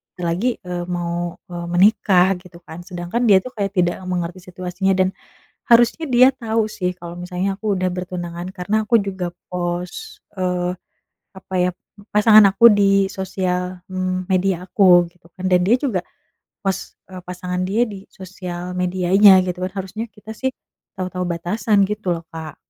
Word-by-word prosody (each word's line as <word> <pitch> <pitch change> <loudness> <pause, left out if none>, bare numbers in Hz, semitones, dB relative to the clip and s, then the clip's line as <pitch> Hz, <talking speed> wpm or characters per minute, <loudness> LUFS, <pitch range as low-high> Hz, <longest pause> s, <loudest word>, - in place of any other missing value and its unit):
bentar 180 - -8
lagi, 190 +9 -1 0.2
eee, 175 -1 -3
mau, 175 0 -3 0.2
eee, 175 0 -5
menikah 185 -1 +4
gitu 180 -2 -15
kan. 160 - -9
Sedangkan 180 +5 -3
dia 200 - +7
tuh 255 - -8
kayak 200 -4 -3
tidak 175 -1 +2
mengerti 180 0 -3
situasinya 185 +1 -1
dan 185 0 +2 0.6
harusnya 240 +7 +4
dia 255 +2 +8
tau 225 -1 +1
sih 180 -2 0
kalau 170 -1 -8
misalnya 180 +2 -2
aku 220 - -11
udah 185 0 0
bertunangan 175 -1 -5
karena 190 +4 -1
aku 235 - +3
juga 190 -2 -3 0.3
pos, 180 - -4 0.2
eee, 180 -1 0 0.7
apa 190 0 -12
ya 180 - +2 0.4
pasangan 210 0 +7
aku 230 +4 +4
di 200 - +4 0.3
sosial, 185 -1 -3
mmm, 185 0 -2
media 190 0 +2
aku 180 -2 +5
gitu 170 -1 -23
kan. 185 - -6
Dan 180 - +5
dia 230 - +5
juga 240 -10 -1 0.6
post 195 -1 -3 0.2
e 185 - -7
pasangan 180 0 -4
dia 220 +5 +2
di 200 -3 -9
sosial 180 -1 -7
medianya 185 +2 +5
gitu 180 0 -4
kan 185 - -3
harusnya 215 +4 -6
kita 210 +2 -11
sih 265 - -2 0.5
tau 185 -1 -3
tau 180 0 -3
batasan 195 +4 +1
gitu 210 -3 -2
loh, 165 - -8
Kak. 160 -2 -7
185 Hz, 165 wpm, -20 LUFS, 180-200 Hz, 0.7 s, dia